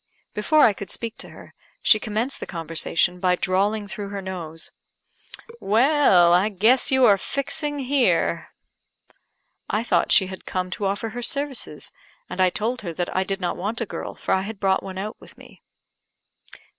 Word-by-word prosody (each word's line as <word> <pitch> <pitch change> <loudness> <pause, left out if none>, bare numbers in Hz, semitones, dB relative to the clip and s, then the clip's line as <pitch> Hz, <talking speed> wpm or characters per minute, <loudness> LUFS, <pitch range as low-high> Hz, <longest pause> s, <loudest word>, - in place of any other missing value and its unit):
Before 300 +9 +3
I 220 - +6
could 200 0 -8
speak 230 -1 -5
to - - -9
her, - - -14 0.3
she 215 - +6
commenced 220 +6 -2
the - - -6
conversation 165 +1 -1
by 180 0 +2
drawling 200 +4 0
through 205 -1 -6
her 200 0 -5
nose, 175 -4 -6 0.9
"Well, 220 - +4
I 185 +4 +4
guess 220 +6 +3
you 265 -1 +4
are 200 -3 +5
fixing 290 +4 -2
here." 270 -1 +1 1.2
I 215 - 0
thought 235 - +1
she 190 - +6
had 190 0 -8
come 185 0 -2
to 200 - -3
offer 200 +3 -2
her 245 +3 -6
services; 280 0 -2 0.4
and - - -3
I 185 - +5
told 225 +7 -2
her 175 -5 -5
that 175 +1 -3
I 185 - +2
did 195 +1 -3
not 180 -2 -2
want 210 +5 -3
a 230 - -1
girl, - - -6
for - - -2
I 190 - +2
had 205 +1 -7
brought 190 -1 +2
one 190 -1 -8
out 210 +3 -5
with - - -15
me. - - -16
205 Hz, 180 wpm, -23 LUFS, 185-235 Hz, 1.2 s, I